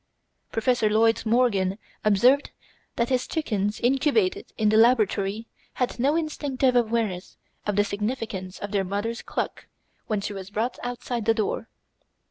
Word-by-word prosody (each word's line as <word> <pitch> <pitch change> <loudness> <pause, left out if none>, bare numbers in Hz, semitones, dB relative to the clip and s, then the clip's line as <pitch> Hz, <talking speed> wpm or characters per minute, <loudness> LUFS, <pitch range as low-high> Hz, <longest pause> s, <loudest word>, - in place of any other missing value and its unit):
Professor 225 -1 +2
Lloyd 225 +1 +3
Morgan 210 -5 +2 0.3
observed 245 +7 +4 0.5
that 235 0 0
his 255 -1 0
chickens 210 - -1
incubated 310 - +1
in 215 -1 +3
the 215 - +3
laboratory 220 -2 +3 0.3
had 250 -1 -2
no 280 +5 +3
instinctive 280 -5 0
awareness 220 -6 0 0.3
of 205 - 0
the 205 - +4
significance 205 -3 -4
of 205 - -6
their 200 -2 +1
mother's 205 +5 -3
cluck - - -4 0.4
when 215 -2 0
she 205 +1 -4
was 195 -1 -7
brought 225 +4 -2
outside 245 -2 -3
the 225 0 +3
door. 220 +1 -2
225 Hz, 140 wpm, -25 LUFS, 205-250 Hz, 0.5 s, observed